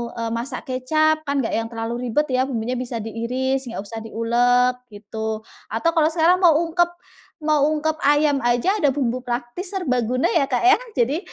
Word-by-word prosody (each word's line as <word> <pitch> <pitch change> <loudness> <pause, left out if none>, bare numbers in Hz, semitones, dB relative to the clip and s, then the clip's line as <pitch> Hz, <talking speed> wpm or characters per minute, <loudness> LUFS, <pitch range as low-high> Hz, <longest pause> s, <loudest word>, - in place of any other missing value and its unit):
eee, 230 -1 -3
masak 235 +3 -4
kecap 310 +5 +2
kan 280 -2 0
nggak - - -2
yang 225 0 -2
terlalu 235 +2 -4
ribet 295 +6 +1
ya 255 +1 +1
bumbunya 245 0 -2
bisa 245 -2 -4
diiris 255 +4 -2
enggak 230 -3 -5
usah 225 +2 -7
diulek 240 +3 +2
gitu, 220 +1 -5 0.2
atau 225 +10 0
kalau 320 -2 +3
sekarang 335 +2 +3
mau 345 -5 +5
ungkep 345 +1 +2 0.6
mau 305 -1 +2 0.2
ungkep 315 +1 -1
ayam 290 -1 +3
aja 245 - +1
ada 295 - +3
bumbu 255 -3 0
praktis 245 +8 -5
serbaguna 255 - 0
ya 285 -5 +2
Kak, 250 +3 -1
ya 380 +4 +6 0.2
jadi, 265 +7 +1
255 Hz, 175 wpm, -22 LUFS, 235-305 Hz, 0.6 s, ya